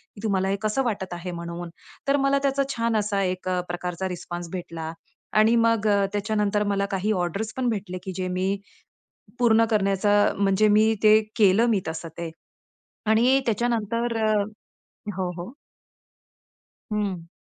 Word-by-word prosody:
की 205 Hz, -, -11 dB
तुम्हाला 190 Hz, -3 st, +1 dB
हे 195 Hz, -, +1 dB
कसं 215 Hz, +5 st, 0 dB
वाटत 195 Hz, -7 st, -3 dB
आहे 175 Hz, +1 st, -5 dB
म्हणून?" 170 Hz, 0 st, -6 dB, 0.4 s
तर 280 Hz, +1 st, +4 dB
मला 275 Hz, 0 st, +3 dB
त्याचा 275 Hz, 0 st, +2 dB
छान 230 Hz, -1 st, 0 dB
असा 205 Hz, -1 st, 0 dB
एक 185 Hz, 0 st, -2 dB
अ, 180 Hz, -, +1 dB
प्रकारचा 180 Hz, +1 st, -3 dB
रिस्पॉन्स 175 Hz, -1 st, -6 dB
भेटला 165 Hz, -3 st, -5 dB, 0.5 s
आणि 220 Hz, +2 st, +5 dB
मग 230 Hz, -2 st, +3 dB
अ, 200 Hz, -1 st, +3 dB
त्याच्यानंतर 210 Hz, 0 st, 0 dB
मला 200 Hz, 0 st, +1 dB
काही 200 Hz, +3 st, 0 dB
ऑर्डर्स 195 Hz, +3 st, -2 dB
पण 250 Hz, -2 st, +1 dB
भेटले, 195 Hz, -4 st, -3 dB
की 190 Hz, -, -5 dB
जे 185 Hz, -1 st, -2 dB
मी 190 Hz, +2 st, 0 dB, 0.8 s
पूर्ण 230 Hz, -2 st, +5 dB
करण्याचं, 205 Hz, 0 st, +3 dB
म्हणजे 200 Hz, +1 st, +3 dB
मी 215 Hz, +1 st, +4 dB
ते 215 Hz, 0 st, +7 dB, 0.2 s
केलं 210 Hz, +2 st, +5 dB
मी 205 Hz, -4 st, +2 dB
तसं 160 Hz, +1 st, -5 dB
ते 170 Hz, -1 st, -4 dB, 0.8 s
आणि 245 Hz, +5 st, +5 dB
त्याच्यानंतर 230 Hz, 0 st, 0 dB
अ 215 Hz, -, +3 dB, 0.9 s
हो, 185 Hz, -2 st, -1 dB
हो. 180 Hz, +8 st, -6 dB, 1.4 s
हं. 195 Hz, -5 st, -2 dB
205 Hz, 150 wpm, -25 LUFS, 185-220 Hz, 1.4 s, ते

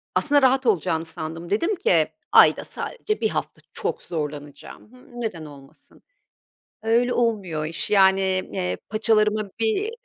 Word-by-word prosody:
aslında 290 Hz, -1 st, +3 dB
rahat 265 Hz, 0 st, +3 dB
olacağını 165 Hz, -6 st, +1 dB
sandım. 160 Hz, +1 st, -6 dB
Dedim 335 Hz, -, 0 dB
ki: 410 Hz, +7 st, +2 dB, 0.2 s
"Ayda -, -, +6 dB
sadece 435 Hz, -3 st, -4 dB
1 -, -, +2 dB
hafta -, -, -4 dB
çok -, -, -3 dB
zorlanacağım. 150 Hz, -, -7 dB
Hımm, 250 Hz, -1 st, -12 dB
neden 170 Hz, -9 st, -4 dB
olmasın?" 140 Hz, -2 st, -16 dB, 0.8 s
Öyle 235 Hz, +2 st, +2 dB
olmuyor 205 Hz, -10 st, -1 dB
o -, -, -2 dB
iş, 165 Hz, -, -2 dB
yani, 195 Hz, -1 st, +5 dB, 0.3 s
eee, 90 Hz, 0 st, -2 dB
paçalarıma 215 Hz, -1 st, +1 dB
bir 305 Hz, -, 0 dB
210 Hz, 135 wpm, -23 LUFS, 160-245 Hz, 0.8 s, Ayda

